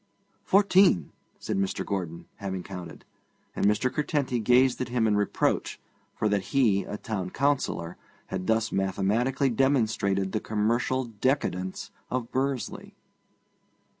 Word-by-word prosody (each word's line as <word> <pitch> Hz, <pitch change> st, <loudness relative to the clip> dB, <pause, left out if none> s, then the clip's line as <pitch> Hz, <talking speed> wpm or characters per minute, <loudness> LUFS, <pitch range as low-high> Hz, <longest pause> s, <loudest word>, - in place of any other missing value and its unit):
'Fourteen,' 190 Hz, -, +4 dB, 0.3 s
said -, -, -3 dB
Mr. 95 Hz, -1 st, -1 dB
Gordon, 90 Hz, -4 st, -4 dB
having 95 Hz, -2 st, -4 dB
counted; 90 Hz, -3 st, -9 dB, 0.5 s
and -, -, +2 dB
Mr. 105 Hz, +5 st, +1 dB
Curtenty 145 Hz, -5 st, 0 dB
gazed 125 Hz, +4 st, +3 dB
at 125 Hz, -, -2 dB
him 120 Hz, -2 st, +1 dB
in 105 Hz, -1 st, +3 dB
reproach, 105 Hz, 0 st, 0 dB, 0.4 s
for 110 Hz, -, 0 dB
that 105 Hz, +3 st, -1 dB
he, 105 Hz, -7 st, +4 dB
a 105 Hz, -, -5 dB
Town 95 Hz, -5 st, -4 dB
Councillor, 135 Hz, -11 st, -1 dB, 0.3 s
had 95 Hz, -1 st, -5 dB
thus 110 Hz, 0 st, +1 dB
mathematically 110 Hz, +8 st, +1 dB
demonstrated 110 Hz, -7 st, +1 dB
the 110 Hz, -, 0 dB
commercial 115 Hz, +5 st, 0 dB
decadence 105 Hz, -5 st, -2 dB, 0.2 s
of 125 Hz, -2 st, -3 dB
Bursley. 135 Hz, -1 st, -3 dB
110 Hz, 125 wpm, -27 LUFS, 95-130 Hz, 0.5 s, Fourteen